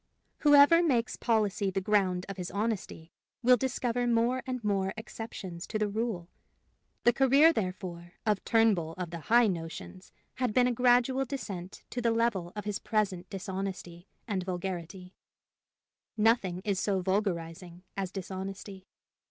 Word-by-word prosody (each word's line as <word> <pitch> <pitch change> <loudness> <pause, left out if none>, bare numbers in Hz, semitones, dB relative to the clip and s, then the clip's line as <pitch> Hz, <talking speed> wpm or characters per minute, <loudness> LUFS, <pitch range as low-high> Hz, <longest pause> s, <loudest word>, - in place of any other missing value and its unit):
Whoever 290 +3 +7
makes 255 -8 +1
policy 210 -4 +1
the 190 - -1
ground 190 -2 +1
of 195 0 -6
his 180 -1 -4
honesty 200 -5 -3 0.3
will 250 +1 +7
discover 245 -1 -1
more 240 +2 +2
and 255 -2 -3
more 195 -2 0
exceptions 195 -6 -7
to 220 - -2
the 215 -1 +1
rule. 205 -4 -3 0.8
The 240 - +5
career, 275 +6 +5
therefore, 180 - -4
of 210 -2 +1
Turnbull 210 -8 +2
of 180 -3 -4
the 170 - -5
high 235 +8 +4
notions 180 0 -5 0.3
had 250 -4 -1
been 250 -1 +5
a 250 - +2
gradual 250 +2 +3
descent 200 -9 -6
to 245 - -3
the 235 - +2
level 225 -6 0
of 210 - -5
his 210 -1 -2
present 195 -5 -1
dishonesty 190 -2 -5 0.2
and 200 -4 -1
vulgarity; 180 0 -5 1.0
nothing 210 -5 +2
is 200 -3 0
so 195 -2 0
vulgarizing 180 -2 -2
as 190 -2 -3
dishonesty. 190 0 -7
200 Hz, 145 wpm, -30 LUFS, 185-235 Hz, 1.0 s, Whoever